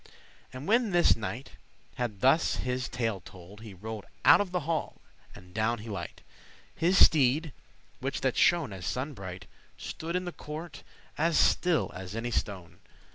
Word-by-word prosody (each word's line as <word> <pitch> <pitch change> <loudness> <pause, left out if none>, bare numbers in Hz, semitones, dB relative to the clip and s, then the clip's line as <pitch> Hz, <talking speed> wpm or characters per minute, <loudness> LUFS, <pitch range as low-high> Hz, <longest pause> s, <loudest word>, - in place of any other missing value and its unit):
And 130 +5 -8
when 230 +2 +3
this 175 -2 +5
knight 115 +4 -5 0.4
had 110 -6 -4
thus 135 +6 +4
his 125 0 -2
tale 115 -5 -1
told, 95 +3 -13
He 110 -4 -10
rode 110 +2 -7 0.2
out - - +8
of 205 - -2
the 180 -1 0
hall, 160 +1 -2 0.4
and 90 0 -14
down 110 +2 +1
he 110 +1 -9
light. 95 -5 -6 0.5
His 180 +3 +2
steede, 150 +1 +5 0.5
which 135 +1 -3
that 130 -2 +1
shone 165 - +3
as 95 -2 -8
sunne 130 - -2
bright, 95 -5 -8 0.3
Stood 165 +2 -5
in 180 0 -1
the 175 - -4
court 160 +2 -8 0.4
as 165 0 +2
still 175 -3 +3
as 95 +2 -7
any 120 +1 -3
stone. 90 -6 -3
125 Hz, 165 wpm, -29 LUFS, 105-160 Hz, 0.5 s, out